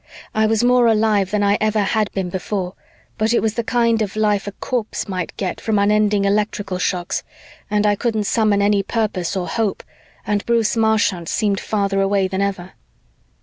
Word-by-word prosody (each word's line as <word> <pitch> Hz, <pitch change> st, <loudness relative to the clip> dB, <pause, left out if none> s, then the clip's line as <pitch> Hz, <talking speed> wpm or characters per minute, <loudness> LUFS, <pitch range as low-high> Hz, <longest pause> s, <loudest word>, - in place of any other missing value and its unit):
I 220 Hz, 0 st, +2 dB
was 225 Hz, +1 st, +1 dB
more 245 Hz, -1 st, +4 dB
alive 215 Hz, -3 st, +2 dB
than 210 Hz, +1 st, 0 dB
I 200 Hz, +1 st, +2 dB
ever 215 Hz, 0 st, +2 dB
had 210 Hz, +1 st, 0 dB
been 185 Hz, -2 st, -3 dB
before, 185 Hz, 0 st, -3 dB, 0.5 s
but 220 Hz, +2 st, +2 dB
it -, -, +4 dB
was 220 Hz, -1 st, 0 dB
the 235 Hz, -, -2 dB
kind 230 Hz, -1 st, +1 dB
of 205 Hz, -1 st, -2 dB
life 210 Hz, -2 st, +1 dB
a -, -, -3 dB
corpse 230 Hz, 0 st, -3 dB
might 185 Hz, -3 st, -4 dB
get 190 Hz, -3 st, -3 dB
from 220 Hz, -2 st, 0 dB
unending 205 Hz, 0 st, +2 dB
electrical 205 Hz, -2 st, -1 dB
shocks 180 Hz, -1 st, -1 dB, 0.5 s
and 210 Hz, 0 st, +1 dB
I 205 Hz, -, +4 dB
couldn't 220 Hz, 0 st, -1 dB
summon 205 Hz, -1 st, +2 dB
any 205 Hz, 0 st, +3 dB
purpose 195 Hz, -4 st, -2 dB
or 180 Hz, -1 st, -2 dB
hope 210 Hz, +3 st, -2 dB, 0.4 s
and 205 Hz, -1 st, 0 dB
Bruce 235 Hz, -1 st, +2 dB
Marchant 215 Hz, -6 st, +1 dB
seemed 205 Hz, -3 st, 0 dB
farther 200 Hz, -2 st, 0 dB
away 195 Hz, -1 st, +2 dB
than 190 Hz, +1 st, -2 dB
ever. 190 Hz, -2 st, -3 dB
205 Hz, 185 wpm, -20 LUFS, 195-220 Hz, 0.5 s, more